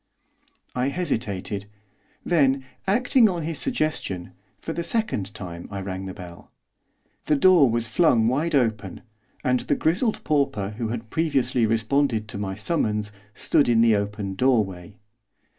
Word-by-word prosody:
I 125 +1 0
hesitated; 110 - -3 0.6
then, 135 -5 +2 0.2
acting 235 +2 +4
on 175 -3 -3
his 160 0 -2
suggestion, 155 - -2 0.3
for 165 - -6
the 170 - -3
second 170 - -1
time 85 -3 -7
I 100 - -5
rang 95 0 -5
the 95 - -6
bell. 90 -3 -11 0.8
The 150 - +3
door 155 -2 +6
was 115 0 -1
flung 115 -2 +3
wide 150 +6 0
open, 110 -8 0 0.4
and 125 0 +2
the - - 0
grizzled 210 +8 0
pauper, 140 -10 0
who 115 - -1
had 115 0 -5
previously 130 -7 +1
responded 115 0 +1
to 100 - -5
my 95 -2 -3
summons, 105 - -1 0.2
stood 140 - +2
in 115 -1 +4
the 115 -2 +5
open 100 -1 -3
doorway. 100 -5 0
115 Hz, 140 wpm, -24 LUFS, 100-155 Hz, 0.8 s, door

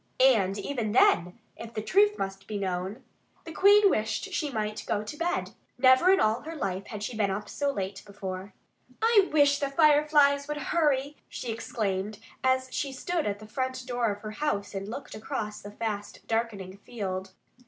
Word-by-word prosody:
And 215 -7 +4
even 225 -3 -2
then, 180 -6 +4 0.2
if 230 0 -10
the 215 - -1
truth 415 - +3
must 195 0 -5
be 215 - -3
known, 190 +2 -3 0.4
the 330 - -8
Queen 405 +4 +6
wished 220 - 0
that 395 - -10
she 305 -4 -1
might 215 -4 -3
go 205 - 0
to 215 - -7
bed. 340 +3 -1 0.3
Never 260 +7 +6
in 385 - +4
all 220 +3 +2
her 325 +1 -7
life 195 -9 -3
had 210 -2 -6
she 235 - -4
been 210 -2 +1
up 205 +2 -3
so 285 +5 -1
late 195 -6 -4
before. 195 -1 -7 0.5
"I 440 -3 +4
wish 285 -1 +4
the 280 - -1
Fireflies 290 -1 +4
would 300 0 -3
hurry!" 290 -1 0
she 240 - -5
exclaimed 210 -3 -3 0.3
as 260 0 +2
she 280 - -2
stood 330 +4 -2
at 200 -1 -1
the 215 - -12
front 255 +3 -3
door 245 -3 0
of 205 0 -7
her 215 - -5
house 210 -6 -2
and 195 0 -4
looked 255 +6 -7
across 215 0 -5
the 205 - -8
fast 205 -1 -5
darkening 210 -5 -2
field. 190 -3 -5
230 Hz, 185 wpm, -28 LUFS, 205-285 Hz, 0.5 s, Queen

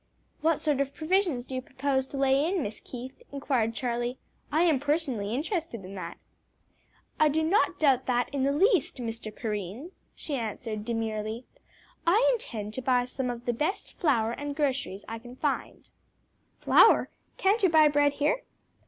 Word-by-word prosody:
"What 320 0 +2
sort 290 -3 +1
of 275 0 -3
provisions 325 -6 +1
do 265 - -9
you 255 - -2
propose 265 0 -1
to 275 - -7
lay 275 +2 +3
in, 370 -5 0
Miss 210 +1 -5
Keith?" 255 - -9
inquired 255 -5 0
Charlie. 240 0 -2 0.3
"I 315 +3 +3
am 320 -6 +3
personally 275 -8 -1
interested 300 - -3
in 190 - -9
that." 190 - -6 1.0
"I 310 - +5
do 315 +2 +1
not 355 +7 +2
doubt 270 -4 +3
that 245 -1 +2
in 280 - -1
the 275 +1 +2
least, 380 +5 +2
Mr. 230 -3 -5
Perrine," 215 - -5 0.2
she 300 - -6
answered 220 -3 -4
demurely. 225 0 -3 0.6
"I 430 +9 +5
intend 220 - -4
to 260 - -4
buy 250 -1 +2
some 255 0 -3
of 240 0 -5
the 240 - +1
best 305 - -2
flour 230 -9 +1
and 285 +3 -4
groceries 270 -9 -1
that - - -11
I 225 - -4
can 245 +2 -12
find." 285 +1 -3 0.7
"Flour? - - +5 0.3
can't 405 +4 +2
you 380 - +5
buy 315 -2 +6
bread 290 -1 +3
here?" 295 +14 +1
265 Hz, 170 wpm, -28 LUFS, 235-305 Hz, 1.0 s, buy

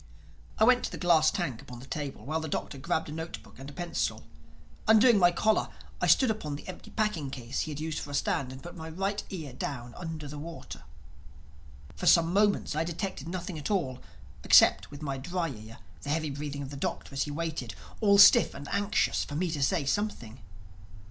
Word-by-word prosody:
I - - +3
went 250 +2 +5
to - - -4
the - - -6
glass 165 -3 +4
tank 120 -4 -3
upon 125 -1 -10
the 125 - -11
table 145 -1 -5
while 155 +3 -1
the 160 - -4
Doctor 140 -1 -4
grabbed 160 +4 -1
a - - -6
note 160 +2 -5
book - - -17
and 135 +1 -8
a - - -11
pencil. 175 +1 -2 0.6
Undoing 220 0 +6
my 175 -1 +6
collar 215 +5 +1 0.3
I - - +2
stood 260 -4 +5
upon 155 -10 -4
the 145 - -10
empty 185 - -9
packing 210 -10 -1
case 125 -3 -5
he 155 - -3
had 145 - -5
been 155 - -4
using 160 -1 -3
for - - -7
a 145 - -3
stand 135 -2 0
and 130 +1 -10
put 175 +1 -9
my 160 -1 -7
right 195 +5 -2
ear 155 -9 -6
down 120 -2 -5
under 160 -4 -6
the 145 +1 -7
water. 165 +2 -8 1.1
For - - -3
some 170 0 +5
moments 205 -6 +2
I 155 - +1
detected 170 -2 -4
nothing 180 -1 -5
at 145 - -4
all—except, 145 -11 +2
with 145 +1 -10
my 135 -2 -3
dry 175 +4 -2
ear, 110 -3 -10 0.2
the 145 - -7
heavy 155 0 0
breathing 145 0 -5
of 135 - -8
the 140 - -7
Doctor 140 - -4
as 140 - 0
he - - -6
waited, 155 -5 -4 0.2
all 200 -2 +5
stiff 200 - +8
and 145 - -8
anxious, 200 +2 +1
for 145 - -7
me 175 +2 0
to 150 -3 -3
say 140 +2 +1
something. 135 - -2
155 Hz, 215 wpm, -29 LUFS, 140-180 Hz, 1.1 s, stiff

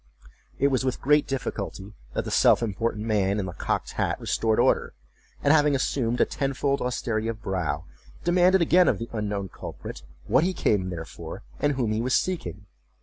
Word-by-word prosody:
It 140 - +3
was 130 -1 +1
with 130 -1 -1
great 150 +2 +3
difficulty 105 -6 -4 0.2
that - - -1
the - - -4
self - - +5
important 110 0 -2
man 105 -2 +1
in 100 - -1
the 90 - -6
cocked - - -2
hat - - -1
restored 110 -1 0
order; - - +2 0.5
and, 145 - +5
having 150 -2 +4
assumed 125 -2 0
a - - +5
tenfold 140 0 -1
austerity 115 -3 -1
of 115 -1 -4
brow, 85 -6 -2 0.4
demanded 180 +1 +4
again 175 +2 +5
of 105 - +3
the 115 +4 -6
unknown 105 -3 -2
culprit, - - -8 0.2
what 130 +7 +3
he 185 +2 +1
came 95 - +1
there 85 -2 -5
for, - - -9 0.2
and 145 - +2
whom 125 -5 -1
he 110 +1 0
was 130 +2 +1
seeking? 165 - -2
115 Hz, 185 wpm, -26 LUFS, 100-140 Hz, 0.5 s, self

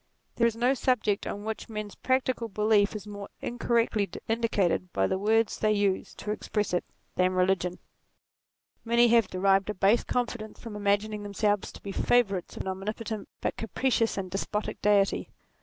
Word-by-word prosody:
There 235 - +4
is 230 - -2
no 245 +3 +3
subject 240 -6 +1
on 205 - -4
which 220 +1 -4
men's 215 -2 -5
practical 255 -2 0
belief 210 -1 +2
is 210 -2 -6
more 205 -1 -8
incorrectly 230 -3 0 0.2
indicated 205 -6 +1
by 95 - +1
the 190 - 0
words 220 +2 +2
they 215 0 +3
use 200 -2 0
to 210 - -4
express 210 -2 -2
it, 175 - +1 0.3
than 185 0 +3
religion. 180 -1 +1 1.1
Many 235 +1 +4
have 230 -3 +5
derived 195 +2 +2
a 210 - -2
base 200 +5 +3
confidence 235 -3 -3
from 225 -3 -8
imagining 205 +1 0
them 205 -1 -8
selves 205 -1 +1
to - - -13
be 200 - -5
favourites 200 -4 +1
of - - -4
an - - -3
omnipotent 210 +3 -4
but - - -2
capricious 230 0 0
and 185 -2 -4
despotic 210 +2 -3
Deity. 200 -1 +2
210 Hz, 170 wpm, -28 LUFS, 195-230 Hz, 1.1 s, have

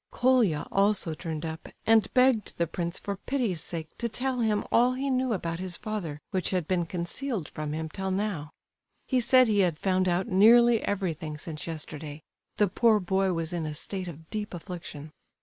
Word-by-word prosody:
Colia 240 - +2
also 195 -4 +2
turned 160 -1 -5
up, 160 0 -6 0.2
and 220 -2 +4
begged 250 -4 +3
the 170 - +2
prince 170 +1 -3
for 200 -1 -4
pity's 225 - -1
sake 160 -1 -2
to 235 - -1
tell 255 +3 -2
him 215 -3 +1
all 245 +2 +4
he 270 +2 -2
knew 255 -1 +1
about 170 -5 -2
his 185 -2 -4
father 185 -9 -4
which 190 -3 0
had 180 -4 -1
been 175 -3 0
concealed 185 - -3
from 150 -1 -5
him 160 +1 -3
till 190 +5 -4
now. 190 -6 -2 0.6
He 260 - +1
said 255 +1 +5
he 210 -2 +2
had 175 -5 +2
found 185 0 +1
out 175 +2 +1
nearly 230 +4 +6
everything 165 -6 -2
since 155 +1 -6
yesterday; 155 -1 -7 0.3
the 210 - +4
poor 220 +3 +3
boy 190 0 +1
was 165 0 -2
in 165 -3 -2
a 150 - -4
state 185 +4 -3
of 160 -1 -9
deep 210 -3 -4
affliction. 165 -4 -8
185 Hz, 185 wpm, -28 LUFS, 165-220 Hz, 0.6 s, nearly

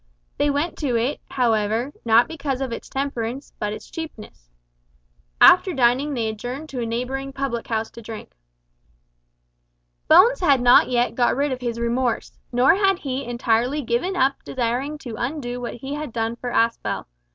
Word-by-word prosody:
They 290 - +3
went 290 +4 -1
to 270 -6 0
it, 240 +5 -1
however, 230 +1 0
not 230 +1 +5
because 280 -5 -3
of 265 -2 -3
its 230 - -7
temperance 270 -1 -4
but 210 - -2
its 215 - -8
cheapness. 220 - -9 0.9
After 370 0 +7
dining 265 +3 +2
they 230 -3 -1
adjourned 245 +8 -5
to 255 -3 -4
a 230 - -2
neighbouring 260 +4 -3
public 270 -4 -3
house 225 -1 -2
to 230 - -11
drink. 220 -1 -9 1.8
Bones - - +6
had 285 -7 +4
not 245 0 +6
yet 245 -1 +1
got 240 -1 +2
rid 280 +2 0
of 255 -1 -4
his 235 -1 -3
remorse, 235 0 -1
nor 250 +4 +5
had 390 0 +2
he 270 -5 -4
entirely 240 +4 0
given 240 +11 -1
up 275 -5 +1
desiring 260 +4 -2
to 245 -5 -8
undo 245 -2 -3
what 240 - -5
he 270 +4 -6
had 295 -3 -5
done 225 0 -2
for 245 +1 -5
Aspel. 230 -1 0
250 Hz, 165 wpm, -22 LUFS, 235-280 Hz, 1.8 s, After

